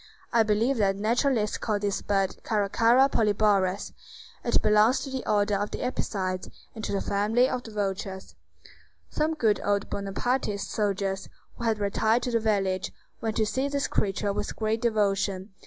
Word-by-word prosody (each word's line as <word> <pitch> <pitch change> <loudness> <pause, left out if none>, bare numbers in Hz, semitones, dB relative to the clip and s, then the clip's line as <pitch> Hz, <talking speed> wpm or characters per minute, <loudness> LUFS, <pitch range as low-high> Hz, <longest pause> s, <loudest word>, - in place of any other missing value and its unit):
I 235 - +5
believe 220 +5 +2
that 195 -3 +2
naturalists 225 +1 +1
call 215 -3 0
this 205 -1 -1
bird 195 -2 0
Caracara 230 +5 +3
Polyborus; 205 -5 +1 0.5
it - - +2
belongs 215 +4 +4
to 270 - -6
the 265 -1 -3
order 205 0 +2
of 205 +1 0
the - - -5
Apicides, 190 -7 -2 0.2
and 220 - -8
to - - -2
the 200 - 0
family 215 +5 +2
of 250 - -2
the 230 - -11
vultures. 195 -2 -4 0.8
Some 315 +1 0
good 220 -8 +2
old 200 0 0
Bonapartist 200 +1 -2
soldiers, 195 -2 -1 0.3
who 235 - -6
had 225 -1 +2
retired 220 +3 +1
to 250 - -2
the 230 - +2
village, 195 -4 0 0.3
went 220 -1 -2
to 220 - +3
see 260 +6 -1
this 280 0 -1
creature 200 0 0
with - - -4
great 220 0 -1
devotion. 200 -3 0
210 Hz, 165 wpm, -27 LUFS, 200-230 Hz, 0.8 s, I